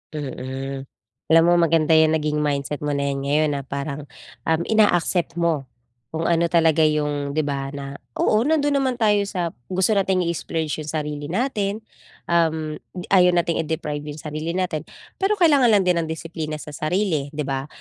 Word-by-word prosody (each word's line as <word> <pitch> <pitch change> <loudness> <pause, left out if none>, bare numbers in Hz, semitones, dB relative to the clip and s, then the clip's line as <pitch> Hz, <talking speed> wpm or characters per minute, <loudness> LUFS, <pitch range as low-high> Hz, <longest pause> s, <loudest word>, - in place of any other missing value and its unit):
Mm. 135 -1 -5 0.4
Alam 165 0 +6
mo, 175 +1 +4
maganda 165 -2 +3
'yan 160 0 +5
naging 150 -1 0
mindset 145 -1 -1
mo 145 -1 -2
na 140 - 0
'yan 135 - -3
ngayon 150 +2 +2
na - - -4
parang, 140 +1 -5 0.4
um, 160 0 +2
ina-accept 175 -5 +2
mo 165 -5 0 0.4
kung 160 +5 -4
ano 170 0 +2
talaga 165 -2 +3
'yong, 145 -2 -1
'di 155 - +2
ba, 140 -1 -2
na 140 0 -7 0.2
oo, 215 - +3
nando'n 290 -2 +2
naman 260 -2 0
tayo 210 -4 +2
sa 175 -4 -2 0.2
gusto 190 +3 +1
nating 190 -3 +2
i-splurge 160 -2 -3
'yong 155 - -6
sarili 150 -2 -3
natin, 210 - -1 0.5
um, 160 -2 +1 0.3
ayaw 180 -2 +5
nating 170 -1 +1
i-deprive 155 -2 -2
'yong 150 +1 -7
sarili 155 +2 -4
natin 175 -5 -2 0.3
pero 390 +2 +2
kailangan 300 -9 +5
lang 210 -4 +4
din 180 -2 +2
ng 165 - -2
disiplina 160 -1 -5
sa 150 0 -8
sarili, 155 -1 -1
'di 150 - -1
ba? 135 0 -3
160 Hz, 170 wpm, -22 LUFS, 150-180 Hz, 0.5 s, Alam